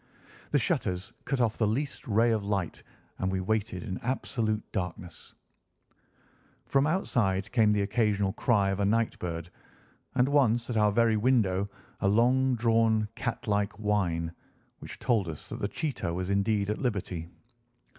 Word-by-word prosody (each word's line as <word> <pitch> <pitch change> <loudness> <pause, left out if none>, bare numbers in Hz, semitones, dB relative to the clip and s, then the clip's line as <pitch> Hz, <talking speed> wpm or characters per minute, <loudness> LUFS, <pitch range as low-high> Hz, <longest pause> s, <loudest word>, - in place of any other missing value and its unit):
The - - +3
shutters 90 0 -1
cut 135 - -1
off 115 -2 +1
the 110 - +3
least 135 +7 -2
ray 115 +2 +3
of 110 -2 0
light, 100 -4 -2 0.4
and 95 - 0
we 95 - -1
waited 105 0 -1
in 95 -5 -4
absolute 115 -3 -1
darkness. 90 -2 -5 1.3
From 140 +1 +2
outside 110 - 0
came 110 -4 +4
the 105 -1 +2
occasional 100 -2 +1
cry 100 -6 +2
of 95 - -2
a 100 - +2
night 115 +2 +1
bird, 85 -1 -5 0.6
and 125 +1 +4
once 125 -4 +2
at - - -2
our 105 -1 +4
very 115 0 +3
window 105 -5 +2 0.3
a - - +1
long 125 +5 +3
drawn 115 -2 +2
catlike 105 -3 -1
whine, 95 -6 0 0.5
which - - -8
told 115 -8 +1
us 80 - -8
that - - -6
the 100 - -1
cheetah 135 - -3
was 90 +2 -2
indeed 100 0 +1
at 105 - -3
liberty. 95 - -3
105 Hz, 155 wpm, -29 LUFS, 95-115 Hz, 1.3 s, came